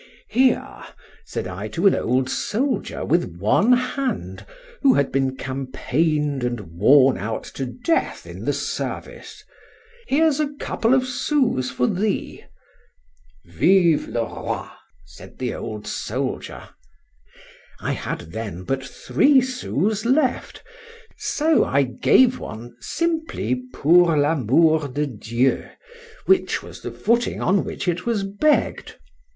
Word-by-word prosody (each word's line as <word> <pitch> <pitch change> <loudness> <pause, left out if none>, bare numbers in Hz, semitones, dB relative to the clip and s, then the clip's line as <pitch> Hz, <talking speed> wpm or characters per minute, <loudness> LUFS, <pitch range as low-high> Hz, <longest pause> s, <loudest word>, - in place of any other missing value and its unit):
—Here! 255 +1 +1 0.4
said - - -4
I 95 +3 -5
to 165 - -3
an 195 - +7
old 130 +2 0
soldier 245 - -2
with 155 - 0
one 110 - +3
hand, 255 +2 -2 0.3
who 275 -2 +5
had 140 - +1
been 135 -1 0
campaigned 140 +2 -1
and 120 -1 -1
worn 105 - +4
out 110 +3 -3
to 135 - -4
death 255 - -1
in - - -9
the - - +1
service—here's 445 - -3
a 295 -1 -1
couple 235 +3 +1
of 260 -1 +2
sous 255 - 0
for 125 -1 0
thee.—Vive 185 -2 -1
le 115 - -1
Roi! - - -5 0.4
said 70 -1 -14
the 125 -2 -3
old 105 -2 -6
soldier. - - -4 1.1
I - - -2
had 85 -2 -5
then 105 -5 -6
but 135 +7 -2
three 275 - +3
sous 220 - -1
left: 260 +2 0 0.5
so 315 +1 +2
I 140 +1 +2
gave 245 - +3
one, 120 +2 -8
simply, 320 - -2
pour 170 - +4
l'amour 150 +2 +3
de 145 +3 -2
Dieu, 120 +1 -1 0.6
which 380 -1 +2
was - - -11
the - - -5
footing 235 +2 0
on 190 +2 +2
which - - -5
it 180 +4 -1
was 220 -4 0
begg'd. 205 +11 0
165 Hz, 120 wpm, -22 LUFS, -, 1.1 s, an